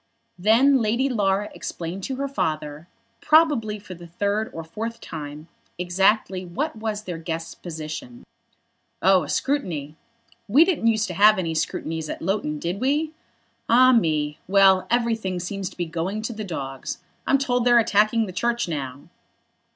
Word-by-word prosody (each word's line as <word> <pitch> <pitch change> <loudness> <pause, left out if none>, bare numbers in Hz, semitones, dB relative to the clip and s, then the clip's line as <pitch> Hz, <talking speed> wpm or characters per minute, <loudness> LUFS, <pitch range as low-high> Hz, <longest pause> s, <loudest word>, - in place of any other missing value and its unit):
Then 245 +7 +5
Lady 235 +5 +1
Laura 205 -3 0
explained 175 +3 -6
to 265 - -3
her 280 +2 -2
father, 155 - -3 0.3
probably 290 -10 +3
for 200 -2 -10
the 175 -1 -11
third 205 +5 -1
or 165 - -6
fourth 225 +8 -6
time, 150 -1 -8 0.3
exactly 190 +2 +1
what 230 - -3
was 215 -1 -4
their 175 -5 -5
guest's 165 0 -5
position. 155 -7 -7 0.8
"Oh, 190 0 +5
a 150 - -6
scrutiny. 165 - -2 0.5
We 275 +11 +6
didn't 330 -11 0
use 220 -1 +3
to 180 - -5
have 210 +3 +6
any 165 -3 -1
scrutinies 160 0 -3
at - - -4
Loughton, 170 -5 -1
did 170 +6 -3
we? 295 +4 +1 0.6
Ah, 255 +2 +7
me; 155 -10 +1
well, 190 -1 +5
everything 225 -6 0
seems 190 +1 -4
to - - -18
be 175 - -1
going 170 +6 -3
to 235 - -3
the 215 -1 -5
dogs. 135 -8 -5 0.3
I'm 275 - +4
told 250 -3 0
they're 240 0 +5
attacking 220 0 +3
the 185 - -8
Church 235 +4 0
now." 140 -4 -4
195 Hz, 160 wpm, -24 LUFS, 165-230 Hz, 0.8 s, Ah